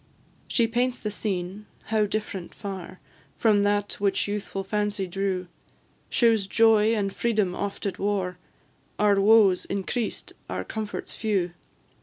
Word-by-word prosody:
She 235 - +3
paints 245 +2 0
the 210 - -4
scene 195 0 -3 0.2
how 215 -1 +1
different 205 -4 -4
far 190 -2 -7 0.4
From 210 -3 +4
that 205 0 +1
which 200 0 +1
youthful 205 -1 -3
fancy 205 0 -1
drew! 185 0 -2 0.6
Shews 225 -5 +3
joy 225 +1 +5
and 200 -2 -1
freedom 210 -6 +1
oft 200 +1 -4
at 200 - -2
war, 190 -3 -1 0.6
Our 205 -1 +4
woes 205 -3 +5
increased, 200 +4 -3 0.2
our - - -2
comforts 215 -2 -5
few. 195 -5 0
205 Hz, 130 wpm, -26 LUFS, 195-215 Hz, 0.6 s, joy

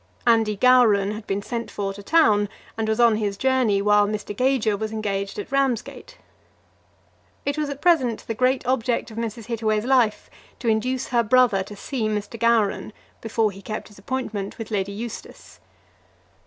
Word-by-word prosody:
Andy 225 -3 +3
Gowran 220 -5 +4
had 215 0 -7
been 200 +1 -2
sent 235 +1 -4
for 195 -1 -3
to 205 - -10
town, 210 -7 +3 0.3
and 225 -1 -2
was 220 +1 0
on 230 -2 +5
his 205 -2 -2
journey 255 -6 +2
while 210 0 +4
Mr. 210 0 -4
Gager 250 -3 +1
was 215 +1 -4
engaged 200 -2 -3
at 205 - -6
Ramsgate. 270 -4 -2 1.3
It 285 0 0
was 300 -1 -2
at 280 0 -7
present 275 -10 +2
the 225 - -3
great 255 +3 +1
object 245 -2 0
of 220 - -11
Mrs. 230 -1 -4
Hittaway's 220 -2 -1
life 245 -5 +2 0.3
to 240 - -6
induce 250 +4 0
her 240 -1 +3
brother 235 -3 +3
to 200 +2 -8
see 225 +2 -3
Mr. 210 +1 -4
Gowran 225 -2 +1 0.3
before 225 -1 0
he 195 0 -12
kept 215 +2 -6
his 210 - -16
appointment 220 -7 -4
with 225 -1 -7
Lady 200 -1 -1
Eustace. 225 +3 -8
220 Hz, 170 wpm, -23 LUFS, 205-250 Hz, 1.3 s, on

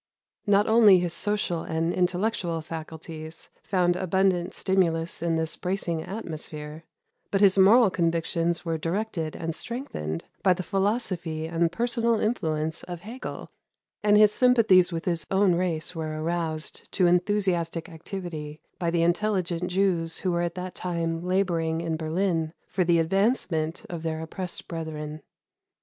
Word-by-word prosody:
Not 205 0 +4
only 220 -4 +7
his 175 -1 -1
social 205 -5 -1
and 165 +2 -1
intellectual 180 -1 0
faculties 160 0 -8
found 180 -2 +1
abundant 185 0 +1
stimulus 170 -4 0
in 170 -1 +1
this 160 0 -1
bracing 180 -3 -2
atmosphere, 155 -5 -7 0.4
but 195 - +1
his 195 -2 +6
moral 200 +3 +6
convictions 170 0 0
were 165 -1 -1
directed 170 -2 -2
and 165 -1 -3
strengthened 120 - -4 0.2
by 185 - +5
the 185 +1 -5
philosophy 190 -6 -1
and 165 0 +1
personal 235 +1 +1
influence 160 -8 -1
of 175 -2 -7
Hegel, 235 +7 -7 0.5
and 210 0 +5
his 210 -1 +7
sympathies 220 -8 +5
with 165 +1 -4
his 170 -4 0
own 190 -1 +4
race 170 -1 -1
were 155 -2 -4
aroused 160 -1 -3
to 185 - +3
enthusiastic 175 -2 +1
activity 160 -3 -7 0.2
by 170 -2 0
the 165 0 +2
intelligent 180 -1 0
Jews 180 -3 +1
who 185 - -1
were 170 0 0
at 175 0 -2
that 180 -1 -5
time 165 -2 -2
laboring 175 -3 0
in 165 -1 -2
Berlin 160 0 -1
for 185 0 0
the 170 -1 +3
advancement 175 -1 0
of 170 -5 -6
their 160 -1 -2
oppressed 175 +2 -4
brethren. 155 -2 -5
175 Hz, 140 wpm, -26 LUFS, 165-195 Hz, 0.5 s, only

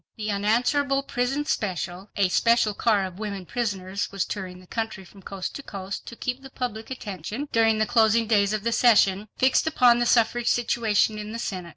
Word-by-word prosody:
The 215 -1 -3
unanswerable 250 +7 +1
"Prison 270 +3 -1
Special"—a 190 - -2
special 230 +1 +3
car 205 -2 +1
of 185 0 -9
women 200 -3 -5
prisoners—was 200 -3 -3
touring 185 -3 -6
the 185 - -16
country 220 -1 -4
from 195 +2 -16
coast 190 0 -6
to - - -8
coast 195 -5 -7
to 235 - -8
keep 250 +2 -4
the 270 - -11
public 225 -4 -5
attention, 215 - -6
during 225 -1 +3
the 215 - +2
closing 225 +1 +3
days 205 -2 +2
of 215 -1 -2
the 235 - 0
session, 210 -4 +4
fixed 260 +4 +3
upon 245 -6 +4
the 240 - +1
suffrage 235 0 +2
situation 220 -2 +1
in 210 +1 -6
the - - -4
Senate. 185 -6 -5
215 Hz, 185 wpm, -25 LUFS, 200-240 Hz, -, session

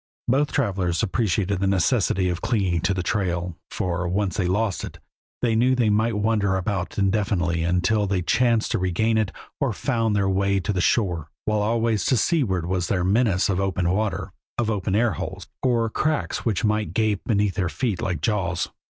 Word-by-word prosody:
Both 140 +4 +2
travelers 95 - 0
appreciated 100 -3 0
the 100 - +1
necessity 95 0 +2
of 90 -1 -3
clinging 100 -8 0
to 90 +3 +1
the 90 - -2
trail, 90 -4 -1
for, 90 -1 -2
once 95 +1 -1
they 95 -5 0
lost 100 +1 0
it, - - -7 0.5
they 115 -2 +2
knew 125 +3 +3
they 115 -4 +2
might 110 +1 +1
wander 105 -2 +1
about 95 -1 -2
indefinitely 95 -4 +1
until 90 +5 +1
they 95 -2 0
chanced 115 +3 +2
to - - +1
regain 110 +5 +1
it 105 -3 0 0.3
or - - 0
found 115 -2 0
their 100 -1 +2
way 100 +1 +1
to 95 +3 -2
the 90 - 0
shore, 90 -8 +1 0.2
while 105 -1 +1
always 115 0 +1
to 130 - +3
seaward 100 - +1
was 90 -1 -1
the 90 -3 0
menace 100 0 +2
of 95 -2 0
open 95 -2 0
water, 105 +2 -2 0.2
of 115 -2 0 0.2
air 115 +1 +3
holes, 80 - -6
or 120 -3 +2
cracks 155 +7 -1
which 110 -2 0
might 105 0 0
gape 110 -3 +1
beneath 105 -3 +1
their 90 -4 -1
feet 110 -2 -2
like 90 -5 -2
jaws. 90 -4 -1
100 Hz, 185 wpm, -24 LUFS, 90-110 Hz, 0.5 s, knew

